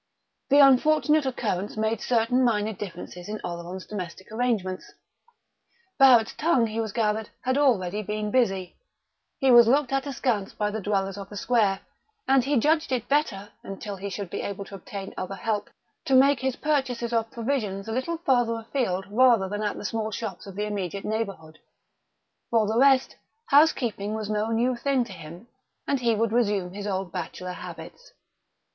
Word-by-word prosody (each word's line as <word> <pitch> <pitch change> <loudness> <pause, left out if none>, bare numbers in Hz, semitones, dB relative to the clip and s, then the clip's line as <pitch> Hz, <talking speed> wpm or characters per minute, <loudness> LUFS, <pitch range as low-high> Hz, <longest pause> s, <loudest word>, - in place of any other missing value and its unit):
The 285 - +5
unfortunate 300 +2 +4
occurrence 210 -6 -2
made 220 0 0
certain 245 +2 +2
minor 220 -2 +1
differences 180 -1 -8
in 215 0 -4
Oleron's 175 +2 -6
domestic 190 -1 -7
arrangements. 220 -6 -2 1.1
Barrett's 250 -5 +6
tongue, 295 -7 +2
he 225 +1 -2
gathered, 215 0 -1
had 260 0 0
already 215 -9 +2
been 210 +1 -3
busy; 195 -8 0 0.6
he 270 -3 +3
was 240 -2 +8
looked 275 +1 +2
at 270 +1 0
askance 235 -7 -1
by 210 0 -1
the 220 +1 -4
dwellers 195 -1 -1
of 195 0 -8
the 205 - -8
square; 205 -4 +1 0.5
and 270 -1 +4
he 280 +2 +1
judged 310 +4 +2
it 250 -4 -1
better, 215 -9 0
until 195 +1 -7
he 200 +1 -6
should 195 -2 -6
be - - -3
able 200 0 -5
to - - -14
obtain 195 +1 -7
other 185 +1 -4
help, 210 0 -2 0.4
to 270 - +2
make 275 +1 +5
his 265 -1 -1
purchases 255 -6 -1
of 225 -1 0
provisions 225 -5 -3
a - - -4
little 260 +8 -2
farther 245 -7 +1
afield 225 -5 -2
rather 235 -3 +4
than 205 +2 -4
at 210 -1 -2
the - - -7
small 220 +1 -2
shops 205 -4 -6
of 195 - -9
the 210 +1 -2
immediate 200 -2 -4
neighbourhood. 195 -8 -4 0.9
For 225 -2 +3
the 220 +3 0
rest, 270 -1 +4 0.3
housekeeping 240 -8 +2
was 215 -1 -4
no 210 +1 0
new 240 +3 +1
thing 265 +1 +1
to 210 - -9
him, 170 +5 -11 0.4
and 280 - +1
he 235 -2 +2
would 225 0 0
resume 205 -6 0
his 205 +1 -6
old 190 -2 -3
bachelor 180 +2 -5
habits.... - - -10
220 Hz, 170 wpm, -26 LUFS, 195-255 Hz, 1.1 s, was